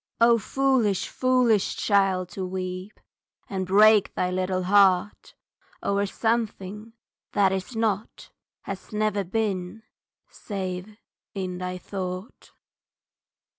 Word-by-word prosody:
O 230 Hz, 0 st, +5 dB
foolish, 255 Hz, -5 st, +1 dB
foolish 250 Hz, -5 st, +2 dB
child, 195 Hz, -3 st, +2 dB
to 190 Hz, -, -5 dB
weep 185 Hz, +2 st, -5 dB, 0.5 s
And 190 Hz, -2 st, -3 dB
break 210 Hz, +2 st, +5 dB
thy 180 Hz, -, 0 dB
little 185 Hz, 0 st, -1 dB
heart 195 Hz, 0 st, +3 dB, 0.5 s
o'er 200 Hz, 0 st, +1 dB
something 220 Hz, -1 st, -2 dB, 0.4 s
that 195 Hz, -2 st, +3 dB
Is 190 Hz, +5 st, -4 dB
not 220 Hz, -2 st, -2 dB, 0.3 s
has 195 Hz, -1 st, -8 dB
never 210 Hz, -1 st, 0 dB
been, 195 Hz, +1 st, -2 dB, 0.4 s
save, 190 Hz, 0 st, -6 dB, 0.4 s
in 185 Hz, -2 st, -4 dB
thy 180 Hz, 0 st, -4 dB
thought!" 185 Hz, +2 st, -6 dB
195 Hz, 100 wpm, -25 LUFS, 185-215 Hz, 0.5 s, O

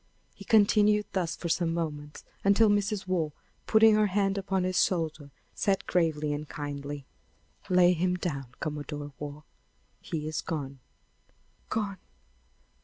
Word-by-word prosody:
He -, -, -13 dB
continued 210 Hz, -1 st, +4 dB
thus 180 Hz, -4 st, -1 dB
for 170 Hz, -, -5 dB
some 165 Hz, 0 st, +1 dB
moments, 150 Hz, -3 st, -4 dB, 0.2 s
until 205 Hz, +2 st, +5 dB
Mrs. 205 Hz, -1 st, +1 dB
Waugh, 170 Hz, -5 st, -1 dB, 0.3 s
putting 220 Hz, 0 st, +6 dB
her 210 Hz, 0 st, +4 dB
hand 195 Hz, 0 st, +1 dB
upon 195 Hz, -1 st, -1 dB
his 185 Hz, 0 st, +3 dB
shoulder, 160 Hz, -5 st, -2 dB, 0.2 s
said 195 Hz, -1 st, 0 dB
gravely 155 Hz, -4 st, +1 dB
and 150 Hz, 0 st, -5 dB
kindly: 145 Hz, -1 st, -5 dB, 0.6 s
"Lay 180 Hz, -1 st, +5 dB
him 180 Hz, +1 st, +1 dB
down, 145 Hz, -7 st, -3 dB
Commodore 145 Hz, -1 st, -5 dB
Waugh; 150 Hz, 0 st, -7 dB, 0.6 s
he 155 Hz, -2 st, -4 dB
is 155 Hz, -, -2 dB
gone." 140 Hz, -4 st, -5 dB, 0.9 s
"Gone! 200 Hz, -4 st, -2 dB
170 Hz, 130 wpm, -29 LUFS, 150-195 Hz, 0.9 s, putting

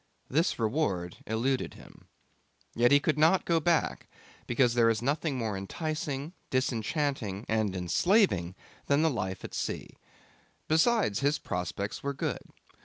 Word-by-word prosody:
This 160 Hz, +6 st, +2 dB
reward 110 Hz, -, -1 dB
eluded 125 Hz, +4 st, -1 dB
him. -, -, -16 dB, 0.7 s
Yet 120 Hz, +1 st, +4 dB
he 145 Hz, -, +7 dB
could 150 Hz, +1 st, 0 dB
not 165 Hz, +5 st, +4 dB
go 170 Hz, -1 st, +3 dB
back, 165 Hz, +1 st, 0 dB, 0.4 s
because 120 Hz, 0 st, +3 dB
there 115 Hz, -1 st, +4 dB
is 110 Hz, -1 st, +1 dB
nothing 140 Hz, +2 st, -1 dB
more 110 Hz, -4 st, -2 dB
enticing, 150 Hz, -, -4 dB, 0.2 s
disenchanting, 130 Hz, -, -1 dB
and 110 Hz, -3 st, 0 dB
enslaving 90 Hz, -, +2 dB, 0.3 s
than 140 Hz, +2 st, +3 dB
the 160 Hz, -, +3 dB
life 95 Hz, -6 st, -3 dB
at -, -, -7 dB
sea. -, -, -3 dB, 0.8 s
Besides, 160 Hz, -, +3 dB
his 145 Hz, +2 st, +2 dB
prospects 90 Hz, +3 st, -4 dB
were 140 Hz, 0 st, -3 dB
good. -, -, -2 dB
130 Hz, 135 wpm, -29 LUFS, 105-155 Hz, 0.8 s, he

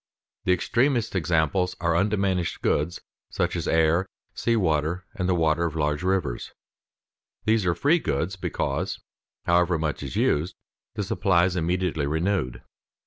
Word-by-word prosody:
_ -, -, -69 dB, 0.4 s
The 90 Hz, -, +3 dB
extremest 120 Hz, -, +1 dB
examples 90 Hz, +2 st, +1 dB
are 85 Hz, -1 st, +1 dB
undiminished 95 Hz, -2 st, 0 dB
goods 80 Hz, +4 st, 0 dB, 0.3 s
such -, -, -1 dB
as -, -, -2 dB
air, 80 Hz, +3 st, +3 dB, 0.3 s
sea 115 Hz, -, 0 dB
water, 85 Hz, -2 st, 0 dB
the 90 Hz, -3 st, 0 dB
water 80 Hz, 0 st, +2 dB
of 80 Hz, -2 st, -3 dB
large 75 Hz, -1 st, 0 dB
rivers. 90 Hz, -9 st, -1 dB, 0.9 s
These 110 Hz, -4 st, +2 dB
are 85 Hz, -, +2 dB
free 150 Hz, -, +3 dB
goods 85 Hz, -, -1 dB
because, 95 Hz, -, -2 dB, 0.5 s
however 85 Hz, 0 st, +3 dB
much 75 Hz, -2 st, -2 dB
is 70 Hz, -3 st, -6 dB
used, 80 Hz, +5 st, +1 dB, 0.4 s
the 105 Hz, -, -1 dB
supply 95 Hz, -2 st, +2 dB
is 90 Hz, 0 st, -1 dB
immediately 85 Hz, -3 st, 0 dB
renewed. 80 Hz, -4 st, -1 dB
90 Hz, 140 wpm, -25 LUFS, 80-95 Hz, 0.9 s, The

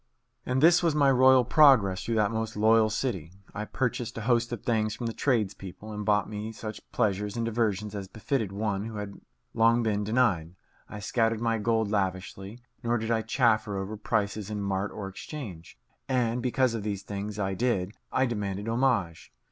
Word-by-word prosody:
And 130 Hz, +2 st, +1 dB
this 170 Hz, +2 st, +7 dB
was 165 Hz, -3 st, +1 dB
my 140 Hz, -2 st, +4 dB
royal 130 Hz, -1 st, +6 dB
progress 125 Hz, -, +5 dB
through 115 Hz, -, -1 dB
that 105 Hz, -1 st, +2 dB
most 110 Hz, -1 st, -3 dB
loyal 110 Hz, +1 st, +4 dB
city. 95 Hz, -, -3 dB, 0.2 s
I 105 Hz, -1 st, -4 dB
purchased 120 Hz, -1 st, -2 dB
a -, -, -3 dB
host 120 Hz, +1 st, +1 dB
of 120 Hz, -, -5 dB
things 110 Hz, -2 st, 0 dB
from 120 Hz, -, -5 dB
the 115 Hz, -, -2 dB
tradespeople, 105 Hz, -5 st, -2 dB
and 105 Hz, 0 st, -4 dB
bought 105 Hz, -2 st, +2 dB
me 105 Hz, +1 st, -5 dB
such 110 Hz, -1 st, -7 dB
pleasures 105 Hz, 0 st, 0 dB
and 115 Hz, -, -1 dB
diversions 105 Hz, -3 st, -1 dB
as 100 Hz, -2 st, -5 dB
befitted 110 Hz, -, -2 dB
one 100 Hz, 0 st, -2 dB
who 110 Hz, -1 st, -6 dB
had 100 Hz, -1 st, -7 dB, 0.3 s
long 115 Hz, +1 st, +4 dB
been 105 Hz, -2 st, 0 dB
denied. 100 Hz, -7 st, +1 dB, 0.3 s
I 105 Hz, -, -7 dB
scattered 115 Hz, +1 st, +1 dB
my 115 Hz, -1 st, 0 dB
gold 110 Hz, -1 st, +1 dB
lavishly, 95 Hz, +2 st, -3 dB, 0.2 s
nor 120 Hz, 0 st, +1 dB
did 110 Hz, 0 st, -3 dB
I 115 Hz, -1 st, +2 dB
chaffer 110 Hz, -3 st, +1 dB
over 95 Hz, +3 st, -4 dB
prices 105 Hz, -1 st, -2 dB
in 105 Hz, -1 st, -3 dB
mart 100 Hz, 0 st, -1 dB
or 100 Hz, -2 st, -6 dB
exchange. 95 Hz, -, -8 dB, 0.3 s
And, 125 Hz, -2 st, +1 dB
because 130 Hz, 0 st, +1 dB
of 115 Hz, -, -3 dB
these 100 Hz, -2 st, -3 dB
things 100 Hz, +1 st, -5 dB
I 95 Hz, -2 st, -1 dB
did, 100 Hz, -3 st, 0 dB, 0.2 s
I 130 Hz, -, +2 dB
demanded 105 Hz, -3 st, -3 dB
homage. 115 Hz, -8 st, 0 dB
110 Hz, 185 wpm, -28 LUFS, 100-120 Hz, 0.3 s, this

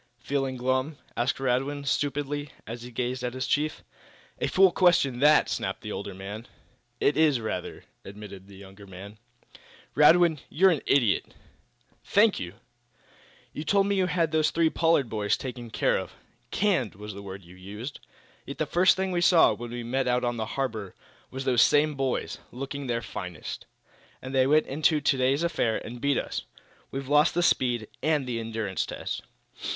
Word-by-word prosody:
"Feeling 135 Hz, +1 st, -2 dB
glum?" 130 Hz, +4 st, -1 dB, 0.2 s
asked 125 Hz, +3 st, 0 dB
Radwin, 135 Hz, +2 st, -1 dB
stupidly, 145 Hz, +1 st, -1 dB, 0.2 s
as 115 Hz, +2 st, -7 dB
he 120 Hz, -, -8 dB
gazed 125 Hz, +1 st, -3 dB
at 125 Hz, 0 st, -3 dB
his 130 Hz, -, -2 dB
chief. 155 Hz, +1 st, -1 dB, 0.6 s
"A -, -, 0 dB
fool 190 Hz, -1 st, +5 dB
question 165 Hz, -10 st, +3 dB
that!" 150 Hz, +2 st, +5 dB
snapped -, -, -3 dB
the -, -, -6 dB
older 100 Hz, -1 st, -5 dB
man. 100 Hz, +5 st, -7 dB, 0.5 s
"It 145 Hz, -, +2 dB
is, 155 Hz, -5 st, +4 dB
rather," 110 Hz, -5 st, -5 dB, 0.2 s
admitted 100 Hz, -1 st, -10 dB
the 100 Hz, -, -14 dB
younger 100 Hz, +1 st, -13 dB
man. 100 Hz, +3 st, -11 dB, 0.7 s
"Radwin, 160 Hz, +1 st, +5 dB
you're 185 Hz, +5 st, +4 dB
an 155 Hz, -, 0 dB
idiot!" 120 Hz, -8 st, +2 dB, 0.7 s
"Thank 210 Hz, +1 st, +3 dB
you!" 90 Hz, +2 st, -6 dB, 1.0 s
"You 150 Hz, -, -5 dB
told 200 Hz, +4 st, +3 dB
me 200 Hz, 0 st, +1 dB
you 190 Hz, -1 st, +2 dB
had 170 Hz, -3 st, 0 dB
those 155 Hz, -1 st, +3 dB
three 165 Hz, -1 st, +2 dB
Pollard 165 Hz, -6 st, +2 dB
boys 105 Hz, -2 st, 0 dB
taken 125 Hz, -2 st, -7 dB
care -, -, +1 dB
of -, -, -7 dB, 0.4 s
'canned' 180 Hz, -, 0 dB
was 105 Hz, +1 st, -8 dB
the 100 Hz, -, -8 dB
word 95 Hz, -1 st, -8 dB
you 90 Hz, +2 st, -15 dB
used. 105 Hz, +9 st, -8 dB, 0.5 s
Yet, 140 Hz, -, -6 dB
the 155 Hz, -, 0 dB
first 175 Hz, +5 st, +4 dB
thing 190 Hz, 0 st, -1 dB
we 175 Hz, -1 st, 0 dB
saw, 175 Hz, -1 st, +6 dB
when 120 Hz, 0 st, -7 dB
we 120 Hz, 0 st, -5 dB
me 125 Hz, +3 st, -1 dB
out 125 Hz, -1 st, +1 dB
on 120 Hz, 0 st, 0 dB
the 110 Hz, -1 st, -3 dB
harbor, 110 Hz, -8 st, -3 dB, 0.3 s
was 130 Hz, +1 st, -6 dB
those 125 Hz, -3 st, +4 dB
same 150 Hz, +3 st, +4 dB
boys, 135 Hz, -2 st, -2 dB
looking 135 Hz, +2 st, -5 dB
their 115 Hz, -1 st, -1 dB
finest. 90 Hz, -6 st, -7 dB, 0.5 s
And 130 Hz, +1 st, -8 dB
they 130 Hz, -1 st, +4 dB
went 155 Hz, +2 st, +4 dB
into 155 Hz, +2 st, +2 dB
today's 135 Hz, +1 st, +2 dB
affair 155 Hz, -10 st, 0 dB
and 120 Hz, +1 st, -8 dB
beat 140 Hz, -2 st, +2 dB
us. -, -, -3 dB, 0.5 s
We've 135 Hz, 0 st, -5 dB
lost 150 Hz, +3 st, +4 dB
the 175 Hz, -, +2 dB
speed 120 Hz, -8 st, +1 dB
and 150 Hz, -4 st, +1 dB
endurance 115 Hz, -4 st, -3 dB
test." -, -, -5 dB
130 Hz, 175 wpm, -27 LUFS, 115-150 Hz, 1.0 s, saw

